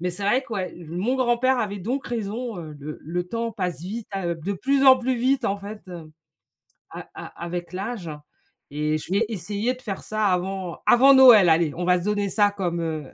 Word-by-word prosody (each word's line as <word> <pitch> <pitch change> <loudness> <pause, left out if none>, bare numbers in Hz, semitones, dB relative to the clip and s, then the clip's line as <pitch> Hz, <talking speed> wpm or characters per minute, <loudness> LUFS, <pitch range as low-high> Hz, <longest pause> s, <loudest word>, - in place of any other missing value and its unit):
Mais 180 +1 -1
c'est 195 +3 -3
vrai 250 +6 +2
que, 235 - -11
ouais, 185 -2 -4
mon 185 +10 -1
grand-père 255 +1 +2
avait 205 -3 -2
donc 245 +8 -3
raison, 230 -1 -4
heu, 155 -3 -8
le 150 +2 -8
le 175 +3 -3
temps 230 +1 -3
passe 180 -6 -3
vite, 215 +5 -6
a 175 -3 -2
de 165 +5 -4
plus 275 +7 +1
en 260 -1 +8
plus 255 +1 -1
vite 260 +3 +1
en 195 - 0
fait, 205 +2 -9 1.1
a - - -9
a - - -9
avec 175 +1 -5
l'âge. 195 -2 -5 0.6
Et 150 +1 -1
je 155 - -8
vais 210 +4 +2
essayer 210 +4 -2
de 255 - -17
faire 195 -5 -6
ça 215 -1 -1
avant 185 -1 -2
avant 270 +3 +7
Noël. 240 -9 +8
Allez, 160 -2 +3
on 175 +1 -3
va 180 0 +3
se 175 - -7
donner 205 -1 0
ça 205 +1 +3
comme, 175 -4 -3
heu, 155 -3 -4
200 Hz, 210 wpm, -24 LUFS, 175-235 Hz, 1.1 s, en